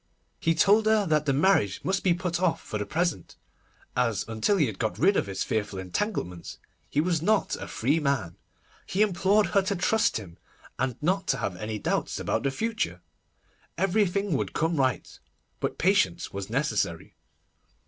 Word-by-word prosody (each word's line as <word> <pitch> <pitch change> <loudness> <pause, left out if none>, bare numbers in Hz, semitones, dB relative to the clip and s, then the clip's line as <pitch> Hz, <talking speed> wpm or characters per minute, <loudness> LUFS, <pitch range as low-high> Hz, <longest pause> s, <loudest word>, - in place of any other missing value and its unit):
He 165 0 +1
told 210 +6 +4
her 215 -2 +4
that 155 -3 +1
the - - +4
marriage 135 - +2
must 195 +1 0
be 180 -3 +3
put 180 -1 -2
off 185 -3 +2
for 105 - -5
the 105 - -3
present, 170 -1 -2 0.6
as 115 -5 +1
until 115 - +1
he 155 - +4
had 110 -6 -5
got 110 - -1
rid 195 +6 +4
of - - +1
his 95 - -2
fearful 105 -2 -2
entanglements, 90 - -3 0.3
he 145 - 0
was 165 0 +1
not 210 +4 +2
a - - -7
free 140 +8 +1
man. 140 - -1 0.5
He 200 +3 +2
implored 200 +1 +3
her 200 - +5
to 195 +1 -1
trust 210 +4 +2
him, 90 -6 -10 0.4
and 130 -1 0
not 190 +4 +1
to - - +1
have 90 - -3
any 105 +3 -4
doubts 100 - -1
about - - -1
the 140 - 0
future. 220 - -2 0.7
Everything 200 -1 +1
would 140 - -1
come 165 0 0
right, 130 -7 -1 0.4
but - - -2
patience - - +1
was 100 0 -5
necessary. 135 +5 -1
160 Hz, 175 wpm, -27 LUFS, -, 0.7 s, her